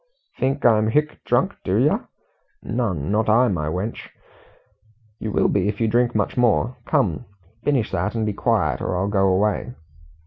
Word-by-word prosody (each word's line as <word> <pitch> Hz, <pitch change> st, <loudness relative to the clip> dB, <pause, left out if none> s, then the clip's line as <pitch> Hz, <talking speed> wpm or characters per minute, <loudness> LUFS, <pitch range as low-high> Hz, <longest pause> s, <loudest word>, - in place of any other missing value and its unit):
"Think 135 Hz, +2 st, -1 dB
I'm 110 Hz, -2 st, +4 dB
hic 150 Hz, +7 st, 0 dB
drunk, -, -, +1 dB
do -, -, 0 dB
yer? -, -, +1 dB, 0.6 s
Nun 100 Hz, -, -2 dB
not 110 Hz, +1 st, +1 dB
I, 120 Hz, +3 st, +4 dB
my 75 Hz, -5 st, -2 dB
wench." 90 Hz, +8 st, -4 dB, 1.1 s
"You 110 Hz, -, -4 dB
will -, -, +2 dB
be 100 Hz, -1 st, +1 dB
if 105 Hz, -, -2 dB
you 115 Hz, -, +2 dB
drink 120 Hz, +2 st, +1 dB
much 105 Hz, -, 0 dB
more. 120 Hz, 0 st, +2 dB
Come, 80 Hz, -9 st, 0 dB, 0.4 s
finish 130 Hz, -7 st, 0 dB
that 105 Hz, -, -2 dB
and 110 Hz, -1 st, 0 dB
be 105 Hz, -, -1 dB
quiet, -, -, 0 dB
or 90 Hz, -, -2 dB
I'll 95 Hz, +2 st, 0 dB
go 95 Hz, -2 st, +2 dB
away." 105 Hz, +6 st, 0 dB
110 Hz, 170 wpm, -22 LUFS, 100-120 Hz, 1.1 s, I'm